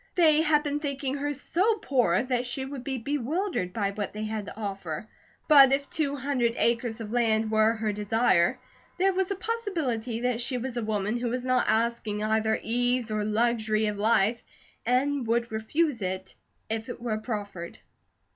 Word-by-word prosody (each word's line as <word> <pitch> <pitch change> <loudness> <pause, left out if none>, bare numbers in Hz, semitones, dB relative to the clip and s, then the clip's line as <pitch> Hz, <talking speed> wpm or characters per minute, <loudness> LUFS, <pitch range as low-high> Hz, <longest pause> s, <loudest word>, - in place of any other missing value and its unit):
They 315 -3 +5
had 300 -2 +3
been 290 0 -1
thinking 280 -2 -3
her 290 +1 -2
so 365 - +1
poor 245 - +2
that 250 -1 -1
she 265 +2 -2
would 265 -2 -7
be 265 -1 -3
bewildered 285 - -2
by 200 -1 -1
what 205 0 -4
they 215 +1 -4
had 215 -1 -4
to - - -9
offer. 195 -3 -4 0.4
But 275 -3 +8
if 280 +1 +1
two 285 -3 0
hundred 260 -4 0
acres 235 -1 +1
of 215 -1 -6
land 225 -2 +1
were 220 +1 +4
her 215 -1 -1
desire, 210 -3 +2 0.4
there 385 +1 +3
was 380 +1 0
a 395 - -1
possibility 330 - -2
that 245 -1 0
she 250 +1 -1
was 250 0 -4
a 240 - -2
women 215 +1 -1
who 240 0 -2
was 250 +1 -2
not 255 -1 +2
asking 220 -2 0
either 220 0 +1
ease 245 0 0
or 215 -1 0
luxury 220 0 +1
of 210 -1 -2
life, 220 +1 +2 0.4
and 260 +1 +1
would 235 0 0
refuse 235 +4 0
it 190 0 -4 0.3
if 225 +2 -3
it 245 - -6
were 230 -3 -2
proffered. 205 -6 -5
235 Hz, 180 wpm, -27 LUFS, 215-275 Hz, 0.4 s, But